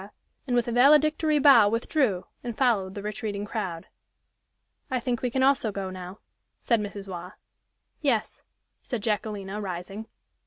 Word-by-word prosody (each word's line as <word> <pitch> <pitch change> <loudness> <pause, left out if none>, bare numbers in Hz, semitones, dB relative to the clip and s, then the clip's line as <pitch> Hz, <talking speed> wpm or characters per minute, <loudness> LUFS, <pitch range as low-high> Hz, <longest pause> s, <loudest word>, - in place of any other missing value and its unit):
and 245 - 0
with 240 -1 +2
a - - -1
valedictory 300 +4 +4
bow 270 -8 +7
withdrew, 230 - 0 0.2
and 235 -3 -5
followed 205 -8 +1
the 200 - -6
retreating 210 -1 -4
crowd. 190 -6 -4 1.0
"I 255 - 0
think 240 0 -2
we 250 - 0
can 260 +2 0
also 265 -5 +3
go 195 -1 -4
now," 185 +1 -9 0.4
said 230 -3 +1
Mrs. 200 -1 -6
Waugh. 180 +1 -7 0.7
"Yes," 255 -8 0 0.4
said 240 -6 -5
Jacquelina, 210 -2 -2
rising. 195 +3 -6
215 Hz, 145 wpm, -26 LUFS, 195-250 Hz, 1.0 s, bow